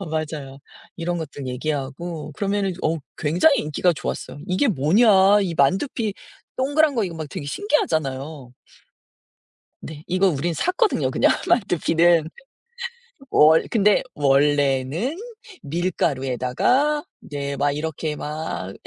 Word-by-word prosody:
아 - - -4
맞아요. 150 -3 -4 0.4
이런 175 +1 -2
것들 145 -4 -6
얘기하고 150 +4 -4
그러면은 200 +2 -1
어 160 +1 0 0.2
굉장히 180 - +3
인기가 155 +4 +1
좋았어요. 145 - -5
"이게 185 +10 +2
뭐냐?" 200 - +4
이 175 -3 -2
만두피 205 - +1 0.4
동그란 285 +1 +2
거 225 - +2
이거 175 -3 -5
막 155 -2 -6
되게 140 - -7
신기하잖아요. 145 - -2 1.3
네. 155 0 -9
이거 185 +2 +2
우린 165 +2 -1
샀거든요 370 - +1
그냥 - - +3 0.2
만두피는. 170 - +3 1.0
월 160 - +5
근데 210 -2 +3
"원래는 145 - +1 0.5
밀가루에다가 165 - 0 0.2
이제 140 -1 -4
막 145 +1 +1
이렇게 155 +1 -3
막 150 -11 -5
160 Hz, 265 characters per minute, -22 LUFS, 145-195 Hz, 1.3 s, 월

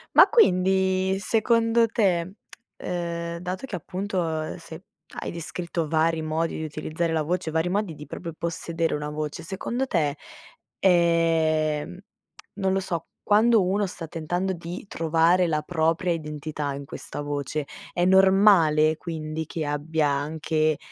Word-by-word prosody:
Ma - - +9
quindi 190 - +3
secondo 230 +1 +2
te, 190 -4 0 0.4
ehm, 170 -1 -4
dato 185 +7 -4
che 225 - -5
appunto, 185 +2 -3 0.2
ehm, - - -6
se 165 +1 -11 0.4
hai - - -4
descritto 170 -1 -4
vari 160 +1 +1
modi 160 +1 -1
di 160 - -4
utilizzare 160 +2 -3
la 160 -1 +1
voce, 175 +1 -2
vari 160 +2 0
modi 195 -4 -1
di 150 - -10
proprio 170 -2 -6
possedere 165 0 -2
una 150 0 -3
voce, 150 +2 -4
secondo 235 +9 -3
te, 150 - 0 0.6
ehm, 165 -3 +2 0.6
non 190 -1 +1
lo 195 - +2
so, 170 -3 -4 0.2
quando 215 0 +4
uno 200 +2 +1
sta 165 -2 -7
tentando 175 +4 -2
di 175 +2 -7
trovare 165 +2 +2
la 150 -2 0
propria 165 +2 0
identità 150 -2 -4
in 140 0 -7
questa 145 - -7
voce, 145 0 -3 0.3
è 175 0 +1
normale 190 -5 +5
quindi 160 -2 -5
che 160 -2 -4
abbia 150 +1 0
anche 155 +2 0
170 Hz, 140 wpm, -25 LUFS, 155-185 Hz, 0.6 s, Ma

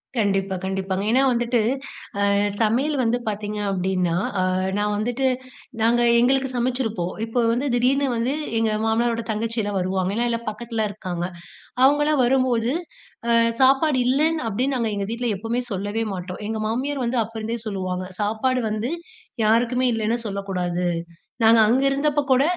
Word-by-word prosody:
கண்டிப்பா, 195 -3 +1
கண்டிப்பாங்க. 190 0 -2
ஏன்னா 260 +2 +4
வந்துட்டு, 240 0 +1 0.7
அ - - +3 0.3
சமையல் 260 +8 +2
வந்து 235 0 +2
பார்த்தீங்க 210 0 -3
அப்டின்னா, 185 -2 0 0.3
அ - - +2 0.3
நான் 210 0 0
வந்துட்டு 245 +5 -1 0.6
நாங்க 235 +2 +3 0.2
எங்களுக்கு 265 +2 +2
சமைச்சிருப்போம். 235 -7 -1
இப்போ 230 +2 -2
வந்து 250 +5 0
திடீர்னு 270 +3 +2
வந்து 235 +4 0 0.3
எங்க 225 -1 +1
மாமனாரோட 230 +1 +1
தங்கச்சி 225 +2 -2
எல்லா 205 0 -3
வருவாங்க. 185 +1 -1
ஏன்னா 240 +1 +1
எல்லாம் 230 -1 -3
பக்கத்தில 220 0 -3
இருக்காங்க. 175 -3 -4 0.6
அவங்களலா 295 +2 +4
வரும்போது 250 -2 +2 0.6
அ 235 - +4 0.3
சாப்பாடு 270 +2 +4
இல்லன்னு 305 +3 +2
அப்டின்னு, 255 +6 0
நாங்க 230 -2 0
எங்க 200 -1 -2
வீட்டில 240 +1 -2
எப்போவுமே 230 +4 -2
சொல்லவே 205 +3 -2
மாட்டோம். 180 +1 -6
எங்க 220 0 -2
மாமியார் 260 +4 -2
வந்து 245 +2 -1
அப்போருந்தே 225 +1 -5
சொல்லுவாங்க, 185 -2 -3 0.2
சாப்பாடு 245 +5 0
வந்து 215 +3 -2 0.6
யாருக்குமே 240 +3 +2
இல்லைன்னு 225 +1 0
சொல்லக்கூடாது. 180 -3 -2 0.6
நாங்க 225 0 +7
அங்கே 260 +5 +3
இருந்தப்போ 290 +1 +1
கூட 260 +2 +5
230 Hz, 145 wpm, -23 LUFS, 205-255 Hz, 0.7 s, நாங்க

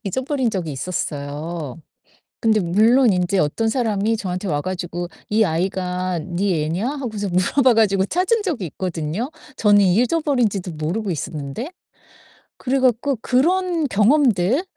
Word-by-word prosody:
잊어버린 260 +5 -1
적이 180 -7 -3
있었어요. 145 0 -4 0.6
근데 220 -2 +3
물론 220 +7 +4
인제 180 +1 0
어떤 220 +10 0
사람이 220 -2 0
저한테 185 0 -4
와 145 -2 0
가지고 175 -1 -4 0.2
"이 220 +1 +3
아이가 180 0 -1
니 175 -1 -1
애냐?" 175 +10 -1
하고서 225 -8 -4
물어봐 235 +8 +3
가지고 200 -3 +3
찾은 375 - +1
적이 285 - -2
있거든요 170 - -4 0.3
저는 205 -1 +5
잊어버린지도 230 - +1
모르고 180 +7 -2
있었는데. 150 - -5 0.9
그래 270 +1 +1
갖고 255 +1 +2
그런 335 +3 +1
경험들 235 - +3
200 Hz, 310 characters per minute, -21 LUFS, 175-250 Hz, 0.9 s, 저는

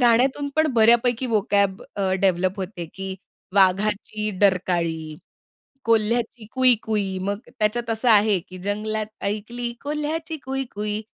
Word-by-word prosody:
गाण्यातून 255 +4 +3
पण 315 0 +4
बऱ्यापैकी 235 +2 +4
व्होकॅब 200 -3 +1
अ, 190 -2 0
डेव्हलप 185 0 +2
होते 180 -2 -5
की 195 0 -5 0.4
वाघाची 205 +2 +2
डरकाळी, 175 -4 +2 0.9
कोल्ह्याची 230 +1 +1
कुई-कुई. 220 -6 +2
मग 200 +2 -2 0.2
त्याच्यात 230 +2 0
असं 225 +2 +1
आहे 210 -3 +5
की. 185 +2 -12
"जंगलात 215 +1 -2 0.2
ऐकली 235 +4 -4
कोल्ह्याची 310 +2 -3
कुई-कुई, 215 -6 -3
215 Hz, 115 wpm, -23 LUFS, 195-240 Hz, 0.9 s, आहे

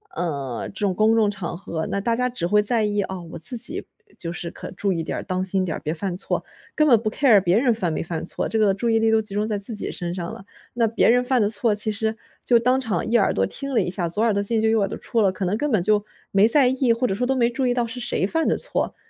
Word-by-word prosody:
呃， 140 -8 -3
这 - - -7
种 185 -2 0
公 215 +2 +3
众 215 -2 +3
场 195 -4 -5
合， 165 -3 -4
那 200 - 0
大 230 +3 0
家 250 +1 0
只 205 -9 -3
会 210 +3 +4
在 220 0 +2
意， 205 -1 0
啊， 190 -1 -5
我 - - -5
自 205 +10 +1
己 235 - -1 0.3
就 170 -1 -4
是， 170 0 -5
可 - - -9
注 195 +1 -1
意 165 -2 -2
点 - - -4
儿， - - -3
当 185 0 -2
心 190 0 +1
点 160 - -3
儿， - - -7
别 155 - -2
犯 175 +2 -4
错， 185 - -3 0.3
根 305 0 +3
本 240 - +6
不 215 - -2
care 235 -6 +4
别 185 +4 +3
人 245 -3 +3
犯 185 -7 -2
没 - - -2
犯 165 -1 -4
错， - - -3
这 225 - -2
个 210 -3 +3
注 230 +4 -1
意 225 0 +3
力 225 0 +2
都 220 0 +3
集 210 -2 -7
中 210 +1 0
在 215 -2 -2
自 200 +3 -4
己 - - -3
身 175 -1 -4
上 175 -2 -5
了。 195 - -10 0.3
那 230 -2 +2
别 225 +1 +2
人 245 +1 +4
犯 250 -1 +1
的 205 - +2
错， 210 0 +1
其 215 +1 +1
实 220 +1 -1 0.3
就 240 - +5
当 250 +3 +2
场 220 -9 -2
一 230 +2 +2
耳 200 - +2
朵 95 - +1
听 275 - -4
了 230 - +3
一 - - -2
下， 175 -2 -1
左 205 +7 -1
耳 230 - +3
朵 200 - 0
进 220 +2 0
就 220 - +2
右 225 0 +3
耳 195 - +1
朵 - - -6
出 235 - -2
了， 200 -3 +4
可 185 +1 -5
能 185 +3 0
根 295 +5 -1
本 210 -7 +2
就， 210 +1 +2 0.3
没 200 +2 +5
在 265 +2 +4
意 260 -2 +2
或 235 +2 -1
者 230 - 0
说 245 +6 -1
都 265 - +1
没 240 -2 +2
注 255 +2 -1
意 245 - +2
到 245 -1 0
是 240 +2 -7
谁 225 - 0
犯 325 +11 0
的 - - +2
错。 - - -1
210 Hz, 340 characters per minute, -23 LUFS, 185-235 Hz, 0.3 s, 本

